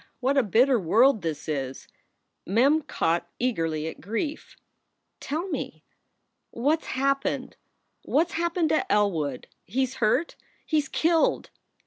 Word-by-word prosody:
what 270 +2 +1
a 275 - +5
bitter 240 +4 +3
world 225 +7 +4
this 160 -3 -4
is 135 -4 -4 0.3
!" - - -52
Mem 270 - +3
caught 170 - -1
eagerly 165 -11 -1
at 160 - -8
grief. 230 - -4 0.6
"Tell 315 +7 -3
me! - - -5 0.7
What 290 +7 +1
s - - -16
happened? 275 +1 -1 0.5
What 325 +4 +1
s - - -10
happened 340 -1 0
to 310 - 0
Elwood? 165 -11 +1 0.2
He 260 +8 -1
s 260 - -3
hurt. 255 +9 +2 0.3
He 310 - +2
s 295 - -3
killed." 330 0 +1
255 Hz, 140 wpm, -26 LUFS, -, 0.7 s, a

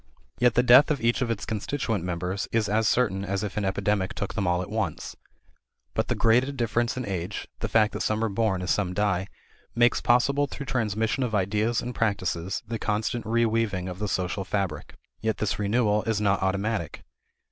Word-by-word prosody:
Yet 125 -1 +4
the 125 - +4
death 125 +4 +7
of 150 -3 0
each 120 +2 +1
of 125 - 0
its 110 -2 -2
constituent 110 -2 -2
members 90 +3 -3
is 115 -2 +1
as 110 +2 +2
certain 100 -6 +1
as 100 0 -2
if 105 - -4
an 105 - -1
epidemic 95 0 0
took 100 - -3
them 100 -4 -1
all 90 +1 +1
at 90 - -9
once. 110 -1 -3 0.8
But - - 0
the - - 0
graded 125 +5 +2
difference 120 0 0
in 130 - -3
age, 95 0 -4
the - - -2
fact 110 0 +3
that - - -4
some 110 +1 0
are - - +2
born 100 -3 0
as 90 - 0
some 95 -3 0
die, 95 -2 0 0.5
makes 120 0 +3
possible 140 +4 +3
through 140 +1 -7
transmission 115 -1 -1
of 120 -4 0
ideas 105 +4 +1
and 125 +1 -4
practices 95 -3 -1
the 115 0 -3
constant 110 +3 -1
reweaving 110 -4 +1
of 90 0 -6
the 105 - -1
social 95 +1 -2
fabric. 95 -6 -3 0.3
Yet 110 -3 0
this 105 -1 -1
renewal 105 0 +2
is 110 -2 0
not 100 -2 +1
automatic. 95 -1 -2
105 Hz, 195 wpm, -26 LUFS, 95-115 Hz, 0.8 s, death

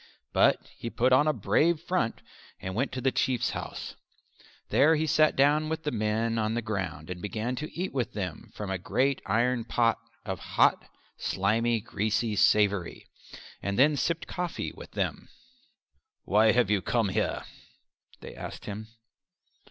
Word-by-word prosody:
But - - +3
he 115 - -5
put 125 +2 +2
on 145 +4 +5
a - - +5
brave 150 - +2
front 170 -9 -1 0.4
and 95 - -5
went 130 +7 -1
to 130 - -3
the 130 +1 +2
Chief's 125 -2 0
house. - - -6 0.8
There 160 +3 +5
he 155 +1 0
sat 155 0 +3
down 150 +3 +3
with 160 0 -3
the 150 - -1
men 115 +1 0
on 110 +1 0
the 120 - 0
ground 90 -7 -4
and 90 -1 -6
began 110 +5 -3
to 155 +3 -5
eat 185 - -2
with 125 -4 -2
them 95 -6 -5
from 100 -2 -4
a 95 - -2
great 135 +8 0
iron 120 +1 +1
pot 115 0 +1 0.3
a 95 -2 -2
hot, - - +2 0.3
slimy, 115 +4 +1
greasy 110 +2 -1
savoury, 100 -3 +2 0.6
and 100 0 -2
then 145 +4 +5
sipped 165 +4 -1
coffee 180 -1 -4
with - - -11
them. - - -3 0.9
"Why 110 +1 +4
have 120 -4 +2
you 100 -2 +2
come 115 +1 +1
here?" 105 +3 -1 0.8
they - - -9
asked - - -8
him. 105 +1 -6
115 Hz, 160 wpm, -28 LUFS, 105-135 Hz, 0.9 s, on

